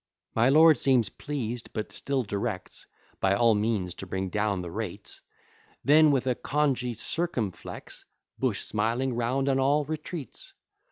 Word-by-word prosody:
My 115 Hz, +3 st, +4 dB
lord 155 Hz, -1 st, +7 dB
seems 125 Hz, -6 st, +3 dB
pleased, 125 Hz, -5 st, -5 dB
but 110 Hz, -1 st, -4 dB
still 135 Hz, -2 st, -1 dB
directs 100 Hz, -2 st, -4 dB, 0.3 s
By 95 Hz, 0 st, +3 dB
all 115 Hz, +1 st, +5 dB
means 105 Hz, -4 st, 0 dB
to 95 Hz, -, -9 dB
bring 95 Hz, +1 st, -2 dB
down 105 Hz, -1 st, 0 dB
the 85 Hz, -, -6 dB
rates; -, -, -5 dB, 0.6 s
Then, 155 Hz, +2 st, +7 dB
with 135 Hz, -3 st, +2 dB
a 130 Hz, -, +2 dB
congee 130 Hz, -3 st, 0 dB
circumflex, 115 Hz, -, -4 dB, 0.4 s
Bush, -, -, 0 dB
smiling 115 Hz, +5 st, -1 dB
round 125 Hz, +3 st, 0 dB
on 135 Hz, -1 st, +2 dB
all, 145 Hz, +2 st, +3 dB
retreats. 155 Hz, 0 st, -6 dB
120 Hz, 145 wpm, -28 LUFS, 105-140 Hz, 0.6 s, lord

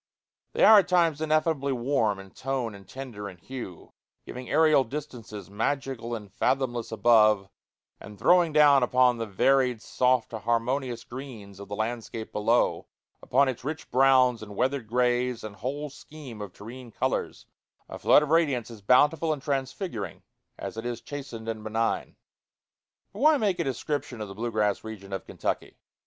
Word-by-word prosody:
They -, -, +1 dB
are 215 Hz, -1 st, +9 dB
at 185 Hz, -, 0 dB
times 170 Hz, -4 st, +2 dB
ineffably 155 Hz, -2 st, +1 dB
warm 120 Hz, -5 st, 0 dB
in 95 Hz, 0 st, -12 dB
tone 130 Hz, -4 st, -3 dB
and 100 Hz, -1 st, -13 dB
tender 115 Hz, -6 st, -7 dB
in 90 Hz, -, -13 dB
hue, 115 Hz, -5 st, -9 dB, 0.3 s
giving 125 Hz, 0 st, -8 dB
aerial 155 Hz, -2 st, +4 dB
distances 120 Hz, -6 st, -7 dB
magical 120 Hz, +1 st, -2 dB
and 105 Hz, -3 st, -10 dB
fathomless 120 Hz, -3 st, -1 dB
above, 110 Hz, -4 st, +4 dB, 0.5 s
and 105 Hz, 0 st, -11 dB
throwing 175 Hz, -, +4 dB
down 145 Hz, -2 st, +6 dB
upon 125 Hz, -1 st, +3 dB
the 115 Hz, -, -3 dB
varied 125 Hz, +4 st, +2 dB
soft 125 Hz, +1 st, +1 dB
harmonious 120 Hz, +2 st, -1 dB
greens 115 Hz, -7 st, -9 dB
of 100 Hz, -, -9 dB
the 100 Hz, -, -5 dB
landscape 110 Hz, 0 st, -4 dB
below, 115 Hz, +3 st, +1 dB, 0.3 s
upon 140 Hz, +2 st, +3 dB
its 130 Hz, -2 st, -4 dB
rich 155 Hz, +3 st, -5 dB
browns 130 Hz, -2 st, +4 dB
and 105 Hz, -1 st, -9 dB
weathered 130 Hz, 0 st, -1 dB
grays 125 Hz, 0 st, 0 dB
and 105 Hz, -1 st, -8 dB
whole 140 Hz, +7 st, -4 dB
scheme 145 Hz, -6 st, -11 dB
of 100 Hz, -3 st, -6 dB
terrene 120 Hz, +6 st, -10 dB
colors, -, -, -2 dB, 0.4 s
a -, -, -8 dB
flood 150 Hz, -, +5 dB
of 150 Hz, -, -4 dB
radiance 145 Hz, -8 st, +1 dB
as 110 Hz, -3 st, -11 dB
bountiful 150 Hz, +9 st, +3 dB
and 145 Hz, -3 st, -3 dB
transfiguring 135 Hz, -, -4 dB, 0.3 s
as -, -, -7 dB
it 115 Hz, -, -4 dB
is 120 Hz, -1 st, -4 dB
chastened 130 Hz, -4 st, -8 dB
and 110 Hz, -1 st, -4 dB
benign. 110 Hz, +1 st, -1 dB, 1.0 s
But -, -, -9 dB
why 305 Hz, +1 st, +5 dB
make 200 Hz, -7 st, 0 dB
a -, -, +2 dB
description 140 Hz, -1 st, -3 dB
of 105 Hz, -, -5 dB
the -, -, -7 dB
blue 115 Hz, +4 st, -3 dB
grass 105 Hz, -2 st, 0 dB
region 100 Hz, -3 st, -8 dB
of 95 Hz, -, -5 dB
Kentucky? -, -, -4 dB
125 Hz, 165 wpm, -27 LUFS, 110-140 Hz, 1.0 s, are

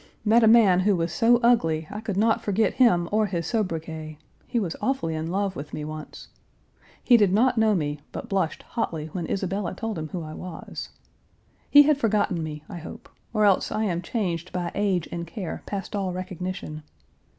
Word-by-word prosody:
Met 225 Hz, +2 st, +5 dB
a -, -, +6 dB
man 215 Hz, -5 st, +6 dB
who 195 Hz, +1 st, +3 dB
was 165 Hz, -1 st, -1 dB
so 235 Hz, +1 st, +4 dB
ugly, 165 Hz, -10 st, +3 dB
I 210 Hz, -, -5 dB
could 210 Hz, -4 st, -3 dB
not 225 Hz, +2 st, +3 dB
forget 210 Hz, +2 st, +1 dB
him 180 Hz, -10 st, +4 dB
or 215 Hz, 0 st, +2 dB
his 170 Hz, -4 st, -3 dB
sobriquet; 160 Hz, -7 st, -3 dB, 0.3 s
he 240 Hz, -, 0 dB
was 180 Hz, -6 st, -2 dB
awfully 260 Hz, -12 st, 0 dB
in 160 Hz, +1 st, -3 dB
love 195 Hz, +1 st, -1 dB
with 145 Hz, -1 st, -7 dB
me 150 Hz, -, -4 dB
once. 155 Hz, 0 st, -8 dB, 0.7 s
He 245 Hz, -, +6 dB
did 205 Hz, -4 st, +3 dB
not 245 Hz, +6 st, +3 dB
know 220 Hz, -1 st, +4 dB
me, 150 Hz, -4 st, -2 dB
but -, -, -6 dB
blushed 190 Hz, -5 st, -1 dB
hotly 160 Hz, -8 st, -3 dB
when 175 Hz, -1 st, -4 dB
Isabella 190 Hz, -1 st, -2 dB
told 220 Hz, -3 st, -4 dB
him 155 Hz, -, -4 dB
who 175 Hz, 0 st, -5 dB
I 155 Hz, 0 st, -7 dB
was. 180 Hz, -1 st, -7 dB, 0.8 s
He 290 Hz, 0 st, +9 dB
had 295 Hz, -1 st, +3 dB
forgotten 205 Hz, -7 st, +1 dB
me, 150 Hz, -1 st, -6 dB
I 175 Hz, -, -7 dB
hope, 160 Hz, -, -10 dB, 0.2 s
or 215 Hz, -2 st, +2 dB
else 195 Hz, -2 st, +3 dB
I 215 Hz, -, 0 dB
am 175 Hz, -5 st, -1 dB
changed 180 Hz, -4 st, -3 dB
by 175 Hz, -1 st, -3 dB
age 195 Hz, -5 st, 0 dB
and 170 Hz, 0 st, -4 dB
care 185 Hz, -2 st, -5 dB
past 200 Hz, 0 st, -4 dB
all 195 Hz, -2 st, -1 dB
recognition. 185 Hz, -3 st, -5 dB
185 Hz, 195 wpm, -25 LUFS, 165-215 Hz, 0.8 s, He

